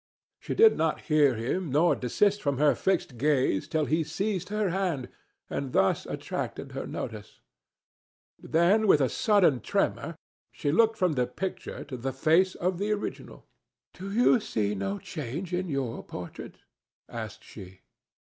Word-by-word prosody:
She - - -4
did 445 0 +6
not 160 -1 0
hear 150 -5 +3
him 140 +10 -2
nor 160 +5 +4
desist 205 - +1
from 140 -2 0
her 145 +1 +4
fixed 170 -10 -1
gaze 135 -8 +1
till 155 -1 0
he 160 +2 +1
seized 185 +3 -3
her 210 -1 0
hand, 175 -9 -1 0.4
and 135 -2 -4
thus 95 - +2
attracted - - -5
her - - -5
notice; - - -7 1.0
then 190 +7 +3
with 155 - +6
a 135 -3 +2
sudden 195 - +3
tremor - - -1 0.4
she 145 - -2
looked 225 +6 +3
from 180 -4 +2
the 125 -3 0
picture 190 +9 -5
to 130 - -7
the 130 +2 -3
face 165 +7 +3
of 180 0 -1
the 205 +1 -1
original. 210 -1 -5 0.5
"Do 195 +2 -7
you 240 +3 +4
see 105 - -1
no 100 0 -2
change 155 - -6
in 180 0 -1
your 135 -5 -3
portrait?" 90 -2 -8 0.5
asked - - -7
she. 95 0 -12
160 Hz, 155 wpm, -28 LUFS, 130-190 Hz, 1.0 s, did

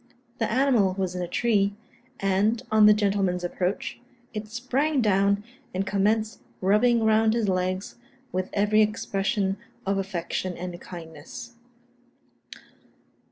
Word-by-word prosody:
The 225 - 0
animal 235 -7 +3
was 190 -2 -1
in 180 - -3
a 175 - -2
tree; 200 -2 +1 0.4
and, 195 +4 +1
on 215 -1 +7
the 210 - +8
gentleman's 195 -3 +1
approach, 180 +2 -2 0.3
it 215 0 -5
sprang 260 +6 0
down, 200 -2 +2 0.3
and 190 +1 0
commenced 215 +3 0 0.2
rubbing 225 +5 +3
round 220 0 +4
his 230 -3 +1
legs, 185 +2 -1 0.3
with 185 0 -2
every 210 +1 +3
expression 200 -2 0 0.3
of 195 0 +1
affection 185 -1 -3
and 175 -1 -6
kindness. 170 - -9
200 Hz, 120 wpm, -26 LUFS, 185-220 Hz, 0.4 s, the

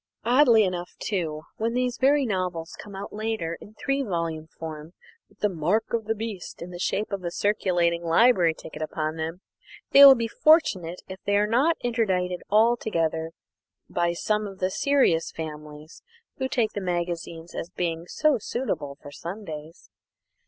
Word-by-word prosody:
Oddly 240 -2 +6
enough, 180 -2 -3
too, 160 -7 -3
when 225 +1 -1
these 250 -1 -1
very 280 +1 +4
novels 180 -6 -3
come 205 -1 -11
out 195 +1 -7
later 215 -6 -2
in 215 - -13
three 275 +5 -1
volume 165 - -3
form, 160 0 -8 0.4
with 205 - -28
the 210 - +4
"mark 190 +6 -1
of 230 -2 0
the 225 +1 0
beast" 215 -4 -6
in 175 +1 -7
the 175 - -8
shape 205 +3 -1
of 195 -2 -3
a 175 - -1
circulating 175 -3 +1
library 170 -1 +4
ticket 160 - -10
upon 155 0 -2
them, 165 +3 -4 0.5
they 280 - +9
will 275 -1 +11
be 230 -2 -1
fortunate 200 - +3
if 190 0 -8
they 205 - +2
are 205 - +3
not 260 +10 +2
interdicted 190 -7 0
altogether 200 -8 +2 0.6
by 170 0 +1
some 210 +4 -1
of 195 -1 -10
the 185 0 -1
serious 260 -12 +2
families 150 0 -8 0.4
who 265 - -1
take 225 -5 0
in 205 - -2
the 180 - -1
magazines 170 -1 -4
as 165 - -5
being 170 -2 -3
"so 305 +1 +2
suitable 170 - -3
for 145 - -9
Sundays." 165 -2 -8
185 Hz, 165 wpm, -26 LUFS, 165-225 Hz, 0.6 s, will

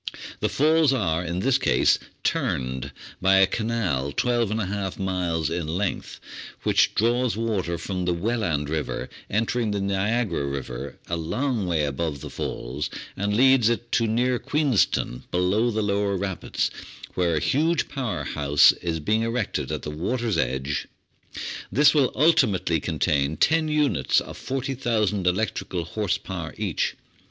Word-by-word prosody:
The - - 0
Falls 155 0 +3
are 90 -9 0
in 85 +1 -3
this 130 +3 +3
case - - +3 0.2
"turned" 65 0 -1 0.3
by 95 +1 +5
a 95 0 +7
canal, 95 - -1
l2^/ 105 - -1
2 - - -18
miles 85 -5 -1
in 85 -2 -2
length, 90 +5 -3 0.4
which - - +3
draws 120 +1 +2
water 105 -7 -1
from 90 -1 -3
the 90 - +1
Welland 90 -7 -1
River 75 0 -3 0.2
entering 115 +2 0
the 105 -1 -1
Niagara 100 -3 0
River 65 -3 -5
a 85 - -2
long 105 - -1
way 80 -3 +1
above 70 0 -3
the - - -7
Falls, 70 +4 -4 0.3
and 105 +2 -1
leads 130 -2 +5
it 120 0 -2
to 115 - +2
near 120 +3 +1
Queenston, 135 - +1
below 95 +6 +2
the 110 -1 -1
lower 100 -1 0
rapids, 95 -1 -2 0.4
where 85 -2 +1
a - - +2
huge 155 - +1
power 130 -6 -3
house 70 0 +5
is 85 -2 -2
being 110 +9 +1
erected 115 -1 -2
at - - -3
the 75 - -4
water's 110 +8 -1
edge. 65 0 -1 0.8
This 145 +2 +5
will 140 -5 +3
ultimately 125 - +3
contain 75 -2 0
ten 160 0 +3
units 150 -5 +2
of - - -8
40,000 115 -7 -1
electrical 90 -2 -1
horse 100 +1 -1
power 85 -4 -6
each. 100 -6 -1
100 Hz, 145 wpm, -25 LUFS, 85-120 Hz, 0.8 s, a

